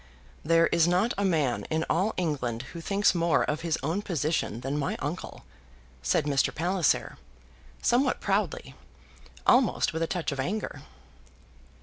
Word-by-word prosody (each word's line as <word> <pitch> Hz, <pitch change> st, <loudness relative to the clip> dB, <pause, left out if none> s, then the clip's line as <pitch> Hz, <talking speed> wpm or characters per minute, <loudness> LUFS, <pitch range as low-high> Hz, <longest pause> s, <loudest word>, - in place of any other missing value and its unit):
"There 165 Hz, +2 st, +4 dB
is 170 Hz, -1 st, +3 dB
not 180 Hz, +7 st, +2 dB
a 200 Hz, -, -1 dB
man 155 Hz, -10 st, +1 dB
in 160 Hz, 0 st, -1 dB
all 190 Hz, +7 st, +1 dB
England 130 Hz, -9 st, -2 dB
who 170 Hz, -, -7 dB
thinks 200 Hz, +4 st, +2 dB
more 170 Hz, -2 st, +2 dB
of 150 Hz, +2 st, -2 dB
his 165 Hz, -1 st, 0 dB
own 165 Hz, +8 st, -1 dB
position 155 Hz, -, -1 dB
than 135 Hz, +3 st, -2 dB
my 140 Hz, -, -1 dB
uncle," 155 Hz, +6 st, -5 dB, 0.6 s
said 60 Hz, -, +1 dB
Mr. 140 Hz, -2 st, +2 dB
Palliser 175 Hz, +1 st, 0 dB, 0.6 s
somewhat 255 Hz, +2 st, +2 dB
proudly, -, -, -1 dB, 0.7 s
almost 245 Hz, -9 st, +3 dB
with 160 Hz, -, -3 dB
a 165 Hz, -, +1 dB
touch 170 Hz, -2 st, -2 dB
of 140 Hz, -, -5 dB
anger. 195 Hz, +11 st, -3 dB
165 Hz, 145 wpm, -28 LUFS, 150-185 Hz, 0.7 s, There